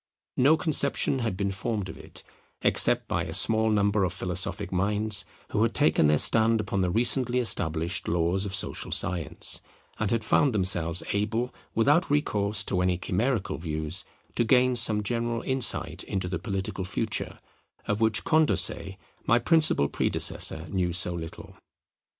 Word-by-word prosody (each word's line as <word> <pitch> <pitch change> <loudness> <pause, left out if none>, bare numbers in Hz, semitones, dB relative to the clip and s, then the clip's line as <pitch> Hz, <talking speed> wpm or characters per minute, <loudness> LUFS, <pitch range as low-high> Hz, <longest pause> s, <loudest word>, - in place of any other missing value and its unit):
No 145 +5 +4
conception 140 -4 +1
had 115 -6 -3
been 100 0 -2
formed 105 0 -4
of - - -9
it, - - -10 0.4
except - - +3
by - - -2
a - - -7
small 110 0 +2
number 105 -1 +1
of 90 - -1
philosophic 90 +2 -4
minds 100 +1 +1 0.2
who 105 - -1
had 115 -2 0
taken 80 -3 +3
their 75 0 +3
stand 115 +6 +4
upon 100 -2 -2
the 90 - 0
recently 120 +4 +2
established 85 -6 0
laws 85 +3 0
of 95 -2 -4
social 95 - -4
science, 85 -5 +1 0.4
and 110 - -1
had 115 0 -1
found 130 +4 +2
themselves 90 -3 +1
able, 110 +5 -2 0.2
without 145 +10 +2
recourse 105 -8 0
to 95 -2 -2
any 90 -1 0
chimerical 105 +4 -2
views, 80 0 -3 0.3
to - - 0
gain 125 +2 +3
some 110 -3 +3
general 115 +2 -2
insight 130 -2 +1
into 95 -2 -3
the 90 -2 -4
political 95 -2 -4
future, 105 +3 -3 0.5
of 105 +1 -2
which 110 -1 +2
Condorcet, 100 - +1 0.3
my 120 - +4
principal 155 - +3
predecessor, 80 +2 -1
knew 90 -3 -1
so 90 +1 0
little. 80 -2 -9
100 Hz, 155 wpm, -26 LUFS, 90-115 Hz, 0.5 s, No